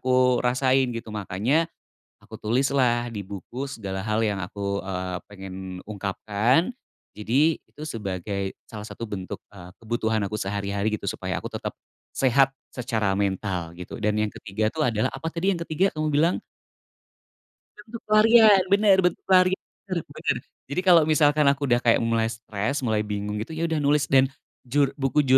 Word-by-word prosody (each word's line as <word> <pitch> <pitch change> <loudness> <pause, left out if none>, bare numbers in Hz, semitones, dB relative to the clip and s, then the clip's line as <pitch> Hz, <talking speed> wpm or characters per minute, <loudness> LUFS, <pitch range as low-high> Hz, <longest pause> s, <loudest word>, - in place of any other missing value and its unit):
aku 125 -1 +3
rasain 130 +1 +3
gitu 115 -1 -6
makanya, 105 - +1 0.6
aku - - -14
tulislah 120 0 +2
di 100 - -4
buku 110 +7 -6
segala 95 -6 -5
hal 110 +1 +1
yang 105 -3 0
aku, 100 +2 -3
eee, 90 -1 -3
pengen 95 -2 -9 0.3
ungkapkan 105 - 0 0.4
jadi 135 +10 +2
itu 150 - -14
sebagai 100 - -4 0.2
salah 105 -2 -7
satu 115 - -7
bentuk, 95 -2 -5
eee, 90 -2 -11
kebutuhan 110 -1 0
aku - - -5
sehari-hari 100 +2 -1
gitu 110 - -5
supaya - - -3
aku - - -5
tetap, - - -4 0.4
sehat 135 +1 +4 0.2
secara 110 -5 0
mental 95 -4 -1
gitu 90 - -7
dan 105 0 +2
yang 105 -1 0
ketiga 105 +2 -2
tuh 160 - -1
adalah 110 0 +1
apa 135 +4 -6
tadi 175 +4 0
yang - - -4
ketiga 185 +5 +1
kamu 155 0 -1
bilang? 165 +4 +3 1.4
Bentuk 235 0 -10
pelarian 215 -1 +7
bener 200 -1 +6
bentuk 180 -1 0
pelarian 185 0 +5 0.3
bener 185 - -1
bener - - -2 0.3
jadi 145 - 0
kalo 175 -3 +7
misalkan 150 -1 +4
aku 140 +1 -2
udah 120 0 +3
kayak 115 -1 +4
mulai 115 -1 +1
stres 110 +4 -3
mulai 110 -2 +1
bingung 105 0 -3
gitu 115 +9 -6
ya 165 - -1
udah 160 -2 0
nulis 145 0 +3
dan 135 0 +6 0.3
jur 135 +2 +1
buku 140 +2 +2
115 Hz, 160 wpm, -25 LUFS, 100-145 Hz, 1.4 s, pelarian